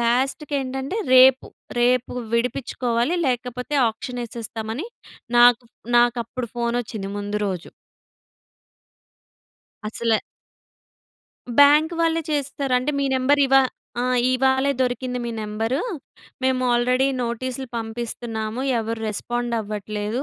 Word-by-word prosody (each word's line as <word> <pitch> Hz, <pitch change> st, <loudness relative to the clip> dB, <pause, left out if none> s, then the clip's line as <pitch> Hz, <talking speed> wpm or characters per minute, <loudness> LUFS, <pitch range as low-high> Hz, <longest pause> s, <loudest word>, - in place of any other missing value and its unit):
లాస్ట్‌కి 265 Hz, +5 st, 0 dB
ఏంటంటే 265 Hz, +7 st, -4 dB, 0.2 s
రేపు, 260 Hz, +1 st, +7 dB, 0.3 s
రేపు 250 Hz, 0 st, +2 dB, 0.2 s
విడిపిచుకోవాలి 240 Hz, +3 st, 0 dB
లేకపోతే 250 Hz, +2 st, -2 dB, 0.2 s
ఆక్షన్ 245 Hz, +2 st, -6 dB
ఎసేస్తామని 230 Hz, -, -5 dB, 0.5 s
నాకు, 240 Hz, 0 st, +6 dB, 0.3 s
నాకు 240 Hz, 0 st, +4 dB
అప్పుడు 240 Hz, +1 st, -5 dB
ఫోన్ 235 Hz, 0 st, 0 dB
ఒచ్చింది 200 Hz, -3 st, -6 dB
ముందు 205 Hz, +1 st, -3 dB
రోజు. 185 Hz, -2 st, -4 dB, 2.2 s
అసల 225 Hz, 0 st, 0 dB, 1.4 s
బ్యాంక్ 300 Hz, +3 st, +6 dB
వాళ్ళే 330 Hz, 0 st, +2 dB
చేస్తారు. 280 Hz, -2 st, -2 dB
అంటే, 255 Hz, +4 st, -1 dB
మీ 280 Hz, -, +1 dB
నెంబర్ 275 Hz, +3 st, +3 dB
ఇవా 270 Hz, 0 st, +6 dB, 0.4 s
ఆ! -, -, 0 dB, 0.3 s
ఇవాళే 265 Hz, +1 st, +2 dB
దొరికింది 250 Hz, 0 st, -1 dB
మీ 235 Hz, -, -3 dB
నెంబరు, 220 Hz, +5 st, -2 dB, 0.6 s
మేము 260 Hz, 0 st, +1 dB
ఆల్రెడీ 250 Hz, +2 st, +2 dB, 0.2 s
నోటీసులు 255 Hz, +2 st, -3 dB
పంపిస్తున్నాము. 225 Hz, 0 st, -4 dB, 0.2 s
ఎవరు 225 Hz, 0 st, -3 dB
రెస్పాండ్ 240 Hz, +3 st, -2 dB
అవ్వట్లేదు, 210 Hz, +2 st, -3 dB
245 Hz, 105 wpm, -23 LUFS, 225-265 Hz, 2.2 s, రేపు